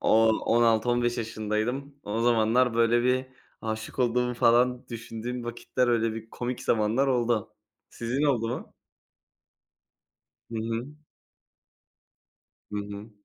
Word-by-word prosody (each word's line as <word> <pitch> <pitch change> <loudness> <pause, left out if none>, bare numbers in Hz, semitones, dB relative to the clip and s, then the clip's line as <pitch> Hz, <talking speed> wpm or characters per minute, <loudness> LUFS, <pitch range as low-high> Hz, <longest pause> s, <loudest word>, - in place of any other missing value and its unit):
o 110 0 +4
on 115 +1 +2
altı 115 0 +3
15 120 0 +1
yaşındaydım. 115 +5 -2
O 105 +2 -2
zamanlar 120 +1 +3
böyle 115 +1 +3
bir 130 +1 +1 0.3
aşık 110 +1 -5
olduğumu 125 0 +1
falan 120 +1 +3
düşündüğüm 120 +1 -5
vakitler 120 +1 -1
öyle 115 -2 +2
bir 115 0 -8
komik 120 0 -4
zamanlar 115 +5 +2
oldu. 120 -4 0 0.4
Sizin 120 +5 -2
oldu 120 -6 +2
mu? 120 - -6 1.8
Hı 115 - -4
hı. 115 +3 -3 1.8
Hı - - -2
hı. 105 +1 -7
115 Hz, 120 wpm, -27 LUFS, 110-125 Hz, 1.8 s, o